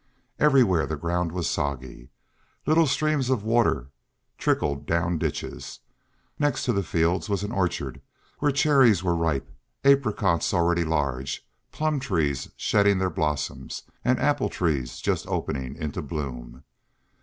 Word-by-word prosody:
Everywhere 125 Hz, -, +4 dB
the 80 Hz, -, -2 dB
ground 85 Hz, +2 st, -1 dB
was 90 Hz, -1 st, -2 dB
soggy; 65 Hz, -5 st, -3 dB, 0.6 s
little 160 Hz, +1 st, +4 dB
streams 145 Hz, -2 st, +1 dB
of 125 Hz, -6 st, +1 dB
water 110 Hz, -, +1 dB, 0.5 s
trickled 70 Hz, 0 st, 0 dB
down 85 Hz, 0 st, +1 dB
ditches. -, -, -4 dB, 0.6 s
Next 145 Hz, -1 st, +1 dB
to 125 Hz, -, +2 dB
the 100 Hz, -, +1 dB
fields 85 Hz, 0 st, 0 dB
was 100 Hz, -1 st, 0 dB
an 105 Hz, -, -3 dB
orchard, 85 Hz, -, -2 dB, 0.4 s
where 145 Hz, 0 st, +2 dB
cherries 135 Hz, -, +4 dB
were 85 Hz, -2 st, +1 dB
ripe, 80 Hz, -5 st, -1 dB, 0.3 s
apricots 110 Hz, -, +3 dB
already 85 Hz, 0 st, +2 dB
large, 70 Hz, -4 st, -2 dB, 0.3 s
plum 155 Hz, -2 st, 0 dB
trees 80 Hz, -, -1 dB
shedding 100 Hz, -1 st, +3 dB
their 95 Hz, -1 st, 0 dB
blossoms, 75 Hz, -2 st, -3 dB, 0.2 s
and 130 Hz, 0 st, +2 dB
apple 145 Hz, -2 st, +1 dB
trees 70 Hz, -8 st, -2 dB
just -, -, -1 dB
opening 65 Hz, -1 st, -3 dB
into 75 Hz, +1 st, -4 dB
bloom. 65 Hz, -4 st, -6 dB
85 Hz, 130 wpm, -25 LUFS, 75-120 Hz, 0.6 s, Everywhere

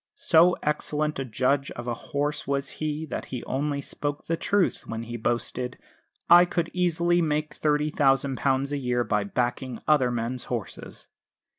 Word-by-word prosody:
So 175 Hz, +2 st, +5 dB
excellent 150 Hz, 0 st, -1 dB
a 135 Hz, -, -2 dB
judge 130 Hz, +4 st, 0 dB
of 120 Hz, 0 st, -7 dB
a 120 Hz, -, 0 dB
horse 145 Hz, +4 st, -3 dB
was 140 Hz, -1 st, -1 dB
he 155 Hz, 0 st, -2 dB
that -, -, -3 dB
he 125 Hz, -2 st, -6 dB
only 140 Hz, +1 st, -2 dB
spoke 145 Hz, +1 st, -4 dB
the 165 Hz, -, 0 dB
truth 200 Hz, +2 st, 0 dB
when 115 Hz, 0 st, -4 dB
he 120 Hz, +1 st, -6 dB
boasted, 120 Hz, +2 st, -2 dB, 0.5 s
"I 175 Hz, +1 st, +9 dB
could 170 Hz, -1 st, -2 dB
easily 175 Hz, -1 st, +2 dB
make 155 Hz, -1 st, -1 dB
£30,000 140 Hz, -2 st, +2 dB
a 145 Hz, -, -1 dB
year 125 Hz, -2 st, 0 dB
by 105 Hz, -3 st, 0 dB
backing 120 Hz, +2 st, -2 dB
other 145 Hz, -5 st, +4 dB
men's 120 Hz, +1 st, -3 dB
horses." 115 Hz, -6 st, -6 dB
140 Hz, 155 wpm, -26 LUFS, 125-155 Hz, 0.5 s, I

